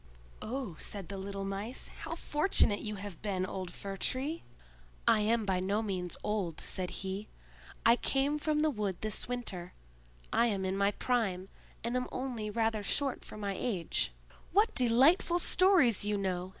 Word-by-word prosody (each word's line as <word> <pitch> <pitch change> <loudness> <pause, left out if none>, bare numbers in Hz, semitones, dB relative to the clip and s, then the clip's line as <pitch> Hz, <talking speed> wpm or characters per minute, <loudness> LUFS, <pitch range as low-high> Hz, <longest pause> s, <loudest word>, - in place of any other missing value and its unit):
"Oh," 240 -6 -4
said 200 -4 -4
the 200 - -5
little 195 0 -4
Mice, 200 +5 -4
"how 330 - -4
fortunate 295 - +2
you 210 -1 -4
have 200 -3 -7
been, 190 -3 -1
old 185 -1 -5
Fir 195 +1 -6
tree!" 280 - -1 0.7
"I - - +6
am 220 +1 +2
by 190 -2 +1
no 200 +4 0
means 185 -4 -2
old," 200 -7 -1
said 185 -1 -1
he. 195 +2 -3 0.6
"I 235 +1 +7
came 280 +4 +1
from 300 0 +1
the 310 0 +3
wood 205 -7 -2
this 215 -2 -1
winter; 205 -8 -4 0.6
I 235 - +4
am 195 -4 -1
in 190 0 0
my 200 0 +3
prime, 200 -5 -1 0.3
and 235 +2 -1
am 250 0 0
only 245 -5 -3
rather 225 0 0
short 270 +6 +1
for - - -9
my 200 -2 -2
age." 185 - 0 0.4
"What 415 +5 +4
delightful 265 +9 +5
stories 345 - +5
you 205 0 0
know!" 185 -2 -2
210 Hz, 165 wpm, -32 LUFS, 195-250 Hz, 0.7 s, I